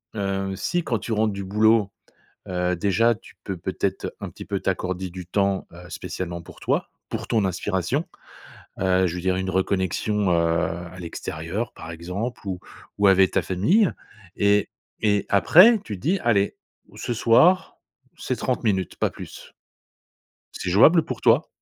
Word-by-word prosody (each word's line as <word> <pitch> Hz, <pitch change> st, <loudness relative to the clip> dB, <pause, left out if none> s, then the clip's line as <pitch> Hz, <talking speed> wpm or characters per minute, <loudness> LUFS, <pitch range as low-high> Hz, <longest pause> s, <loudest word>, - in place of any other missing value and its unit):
heu, 95 Hz, -1 st, -2 dB
si 175 Hz, -, -1 dB
quand 115 Hz, -8 st, -1 dB
tu 115 Hz, -, -6 dB
rentres 110 Hz, 0 st, +1 dB
du 100 Hz, -, -5 dB
boulot, 105 Hz, +1 st, +3 dB, 0.6 s
heu, 90 Hz, 0 st, 0 dB
déjà 105 Hz, +6 st, +2 dB
tu -, -, -17 dB
peux 95 Hz, -2 st, -4 dB
peut-être 85 Hz, -, -3 dB
un -, -, -6 dB
petit -, -, -10 dB
peu 100 Hz, -1 st, -2 dB
t'accorder 95 Hz, 0 st, -2 dB
du 90 Hz, 0 st, -8 dB
temps, 100 Hz, 0 st, 0 dB
heu, 85 Hz, 0 st, -12 dB
spécialement 85 Hz, -2 st, -5 dB
pour 85 Hz, -, -14 dB
toi, -, -, -1 dB, 0.2 s
pour -, -, -4 dB
ton 110 Hz, -3 st, +1 dB
inspiration. 95 Hz, -, -1 dB, 0.8 s
Heu, 95 Hz, 0 st, +3 dB
je 85 Hz, -, -3 dB
veux -, -, -4 dB
dire 90 Hz, +1 st, 0 dB
une 95 Hz, 0 st, -2 dB
reconnexion, 95 Hz, +2 st, 0 dB
heu, 85 Hz, -, +4 dB
à 85 Hz, +1 st, -1 dB
l'extérieur 85 Hz, +5 st, -5 dB
par 80 Hz, -, -9 dB
exemple 90 Hz, +10 st, -5 dB
ou 95 Hz, -2 st, -3 dB, 0.4 s
ou 100 Hz, -, +4 dB
avec 95 Hz, -1 st, +5 dB
ta -, -, +2 dB
famille 170 Hz, -, +2 dB, 0.5 s
et 100 Hz, 0 st, +3 dB, 0.3 s
et 105 Hz, -2 st, +1 dB
après 180 Hz, -, +7 dB
tu 105 Hz, -, -5 dB
te -, -, -14 dB
dis: 180 Hz, -, +1 dB
«Allez 100 Hz, -4 st, +2 dB, 0.4 s
ce 120 Hz, -, -3 dB
soir, 160 Hz, +12 st, +4 dB, 0.4 s
c'est -, -, -3 dB
30 -, -, -2 dB
minutes, 95 Hz, -5 st, 0 dB
pas -, -, 0 dB
plus». -, -, -11 dB, 1.0 s
C'est 95 Hz, -, -4 dB
jouable 155 Hz, -, +6 dB
pour 130 Hz, -, -5 dB
toi? 120 Hz, +6 st, +4 dB
95 Hz, 165 wpm, -24 LUFS, 90-110 Hz, 1.0 s, après